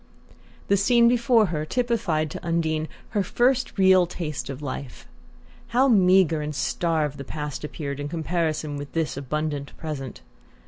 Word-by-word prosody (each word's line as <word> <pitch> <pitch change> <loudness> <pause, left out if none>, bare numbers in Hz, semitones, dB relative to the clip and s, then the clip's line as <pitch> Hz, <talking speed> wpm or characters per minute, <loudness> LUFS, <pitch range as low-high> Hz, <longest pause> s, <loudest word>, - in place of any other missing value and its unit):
The 200 - +3
scene 235 +4 +4
before 235 -2 +4
her 150 -1 -1
typified 170 - 0
to - - -7
Undine 160 -2 0 0.2
her 205 - 0
first 245 +6 +1
real 190 -2 +5
taste 155 -7 -5
of 135 -1 -5
life. 140 -2 -6 0.6
How 250 +3 +3
meagre 185 - +4
and 150 0 -4
starved 150 0 -1
the - - -4
past 150 +1 -5
appeared 145 -2 -5
in 145 - -3
comparison 160 -2 -2
with 145 0 -8
this 165 -2 -1
abundant 145 +1 -3
present! 140 -5 -6
160 Hz, 145 wpm, -25 LUFS, 150-195 Hz, 0.6 s, real